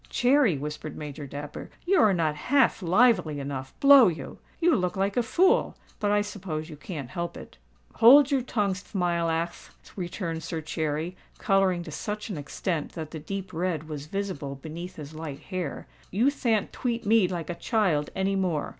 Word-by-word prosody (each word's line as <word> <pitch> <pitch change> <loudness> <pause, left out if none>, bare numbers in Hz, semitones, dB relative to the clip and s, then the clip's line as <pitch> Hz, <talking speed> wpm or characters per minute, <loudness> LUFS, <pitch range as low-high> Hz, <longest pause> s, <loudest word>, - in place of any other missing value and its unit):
"Cherry," 250 - +3
whispered 150 +2 -6
Major 145 -1 -7
Dapper, 145 +2 -7 0.2
"you 380 +2 +3
are 215 - +6
not 165 -4 +1
half 255 - +2
lively 180 -5 +3
enough—blow 140 - +5
you! 160 -6 -4 0.2
You 345 -1 +4
look 180 -3 -1
like 195 +1 0
a 245 - +3
fool—but 345 - +1
I 205 0 +3
suppose 175 -6 -5
you - - -7
can't 145 -3 -7
help 170 +3 -4
it." - - -12 0.4
"Hold 275 +5 +8
your 275 -2 +3
tongue, 210 -5 0
Thmilackth," 170 -3 -2 0.3
returned 175 -3 -4
Sir 165 0 -4
Cherry, 160 +2 -3 0.2
colouring 190 -3 +2
to 160 - -9
such 210 +7 -4
an 185 - -4
extent 155 +2 -3
that 160 -3 -6
the 160 - -6
deep 190 +4 -6
red 165 -2 -2
was 150 -2 -6
visible 170 -7 -4
beneath 160 +6 -8
his 150 0 -9
light 155 -3 -7
hair. 180 -6 -5 0.2
"You 235 +9 +2
than't 230 -7 0
tweat 235 -2 -2
me 215 -2 +4
like 175 -2 -4
a - - -2
child 170 -5 0
any 195 +1 0
more." 180 -6 0
180 Hz, 170 wpm, -27 LUFS, 155-210 Hz, 0.4 s, Hold